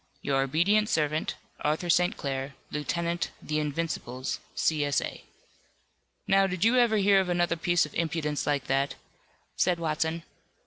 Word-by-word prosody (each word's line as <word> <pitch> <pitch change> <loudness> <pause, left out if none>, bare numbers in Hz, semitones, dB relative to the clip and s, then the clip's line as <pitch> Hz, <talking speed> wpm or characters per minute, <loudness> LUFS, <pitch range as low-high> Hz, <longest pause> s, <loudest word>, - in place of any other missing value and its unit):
"Your 135 -1 +1
obedient 180 +10 +2
servant, 155 0 0 0.2
ARTHUR 155 +3 0
ST. 180 +5 +2
CLAIR, 135 0 -4 0.2
Lieutenant 170 +3 -1
'The 155 0 -2
Invincibles,' 145 -4 -3 0.2
C. 155 -2 +1
S. 145 -1 +2
A." - - -6 1.0
"Now, 195 0 +4
did 185 +1 -1
you 230 +3 +4
ever 235 -3 +4
hear 200 -1 +5
of 190 -2 0
another 175 -1 +1
piece 175 0 +2
of 150 - -12
impudence 155 -3 -1
like 145 -2 0
that?" 135 +1 0 0.6
said 180 -1 +2
Watson. 160 0 -1
165 Hz, 145 wpm, -28 LUFS, 150-180 Hz, 1.0 s, hear